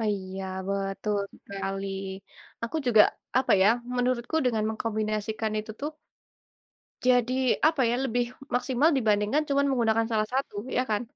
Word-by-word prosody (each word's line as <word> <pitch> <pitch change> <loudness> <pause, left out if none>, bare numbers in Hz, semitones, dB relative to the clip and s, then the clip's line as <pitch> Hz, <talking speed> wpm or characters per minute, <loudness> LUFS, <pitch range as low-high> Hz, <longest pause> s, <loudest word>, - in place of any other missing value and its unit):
Ah, 220 - 0
iya 190 0 -6 0.2
betul 200 +1 -1 0.3
sekali, 195 0 -4 0.8
aku 230 +7 -2
juga 220 -3 +7 0.4
apa 260 - +2
ya, 200 - +6 0.3
menurutku 245 +4 0
dengan 220 -3 +1
mengkombinasikan 215 0 -2
itu 215 +1 -5
tuh 295 +2 -2 1.1
jadi 250 -1 +3 0.3
apa 315 -3 +2
ya, - - +1
lebih 245 -1 +1 0.3
maksimal 255 +5 +3
dibandingkan 215 +4 +2
cuman 280 0 +2
menggunakan 225 -3 +2
salah 215 -1 +1
satu 270 -4 -1 0.2
ya 255 - +3
kan? 210 +1 +1
225 Hz, 135 wpm, -27 LUFS, 210-250 Hz, 1.1 s, juga